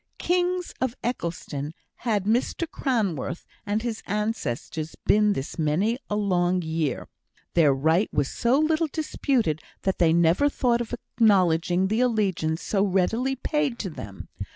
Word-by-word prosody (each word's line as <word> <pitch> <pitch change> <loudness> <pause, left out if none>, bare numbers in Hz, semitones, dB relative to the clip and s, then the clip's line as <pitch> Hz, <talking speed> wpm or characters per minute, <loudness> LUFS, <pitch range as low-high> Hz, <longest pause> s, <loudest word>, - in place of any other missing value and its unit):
Kings 360 0 0
of 260 -2 0
Eccleston 165 - -4 0.2
had 215 -5 0
Mr 240 - 0
Cranworth 210 - -2 0.2
and 210 +2 0
his 230 -2 -3
ancestors 195 - -3
been 210 0 +4
this 135 0 -5
many 185 - +1
a 210 - 0
long 180 -3 +1
year; 160 -4 -2 0.5
their 160 -4 +5
right 160 +9 +2
was 145 -2 +1
so 240 - +1
little 315 +1 +2
disputed 260 - 0 0.2
that 190 - 0
they 165 -2 +5
never 170 - +4
thought 240 -4 +1
of 235 - -5
acknowledging 185 -6 +2
the 220 +4 +1
allegiance 195 -9 0
so 195 -2 +1
readily 215 +7 +1
paid 285 -1 -1
to 190 -6 -4
them. 100 -9 -9
205 Hz, 140 wpm, -25 LUFS, 165-245 Hz, 0.5 s, their